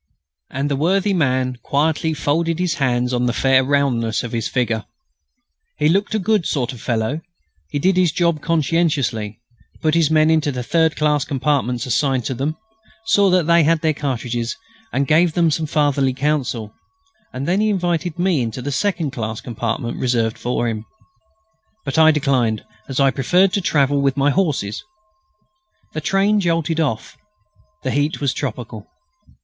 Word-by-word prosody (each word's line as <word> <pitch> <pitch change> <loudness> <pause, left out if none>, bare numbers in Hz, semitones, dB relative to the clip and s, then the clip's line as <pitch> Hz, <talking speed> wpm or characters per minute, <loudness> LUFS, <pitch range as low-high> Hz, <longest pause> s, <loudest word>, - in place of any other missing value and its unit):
And 140 +2 -2
the 145 - 0
worthy 190 +7 +1
man 130 -6 0
quietly 155 +2 0
folded 165 +3 0
his 180 -2 0
hands 125 -1 +1
on 125 0 +1
the 120 - 0
"fair 130 0 +3
roundness" 130 -5 0
of 120 - -5
his 115 -2 -2
figure. 115 -4 -1 0.9
He 150 - +2
looked 200 +5 +1
a - - +3
good 210 -2 +1
sort 135 -2 -1
of 120 - -11
fellow. 120 +6 -1 0.5
He - - -3
did 185 +6 +2
his 180 -3 +3
job 170 -2 0
conscientiously; 150 -10 0 0.4
put 155 -1 +1
his 165 -3 +3
men 155 0 +4
into 155 -2 +2
the 125 -2 -4
third 160 +5 +2
class 150 -2 +1
compartments 130 -3 -1
assigned 130 -1 0
to - - -2
them; 140 +6 -3 0.5
saw 205 -3 +4
that 180 -3 +3
they 170 +1 +5
had 160 +1 +2
their 160 -1 +2
cartridges, 120 -4 -3 0.3
and 140 - 0
gave 160 +4 +3
them 170 -1 +2
some 155 +1 -1
fatherly 140 -3 +1
counsel; 130 -6 -1 0.6
and 130 +3 -5
then 185 +4 +2
he 215 - +2
invited 175 -3 -1
me 175 -5 +1
into 115 +1 -4
the 145 - -3
second 165 -1 -1
class 110 -2 -4
compartment 115 0 -4
reserved 115 -3 0
for 120 0 -1
him. 110 -2 -3 1.0
But 140 +3 0
I 160 0 +7
declined, 135 -8 +1 0.2
as 135 0 -3
I 135 -1 +4
preferred 180 +9 +2
to 200 - +1
travel 145 -4 +2
with 135 0 +1
my 140 +1 +3
horses. 145 - -1 1.1
The 155 - -3
train 195 +5 +2
jolted 165 -3 0
off. 135 -9 -2 0.7
The 130 - -1
heat 145 +3 0
was 140 -3 0
tropical. 120 -6 -5
145 Hz, 165 wpm, -20 LUFS, 125-165 Hz, 1.1 s, I